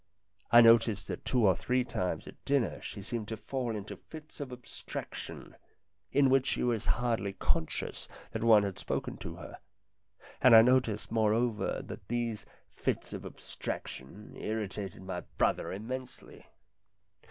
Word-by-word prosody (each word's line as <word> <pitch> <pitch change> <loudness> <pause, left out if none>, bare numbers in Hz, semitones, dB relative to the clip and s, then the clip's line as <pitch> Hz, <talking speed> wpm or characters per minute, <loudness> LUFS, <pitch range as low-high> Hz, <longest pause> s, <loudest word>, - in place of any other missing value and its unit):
I 120 +1 +10
noticed 115 -3 +5
that - - -5
two 125 -4 +3
or 95 -3 +5
three 125 +6 +1
times 95 -7 -2
at - - -12
dinner 140 -6 +1
she 100 - -7
seemed 110 0 -4
to 110 - -4
fall 125 -1 -3
into 105 0 -6
fits 155 -1 -12
of 140 -3 -5
abstraction, 125 -1 -8 0.6
in 135 -2 +4
which 135 -1 +4
she - - 0
was 120 -3 0
hardly 115 -5 +1
conscious 80 -4 -2 0.2
that 115 - -3
one 110 -3 +7
had 100 -2 -3
spoken - - -3
to - - -7
her; - - -10 0.8
and 125 -3 +8
I 110 - +10
noticed, 115 -5 +2
moreover, 110 0 +1
that 95 - -9
these 120 -2 -2 0.3
fits - - -2
of - - -5
abstraction 85 +11 -7
irritated 105 -3 -4
my 95 -1 -4 0.2
brother - - +1
immensely. 125 +6 -7
115 Hz, 145 wpm, -31 LUFS, 105-125 Hz, 0.8 s, I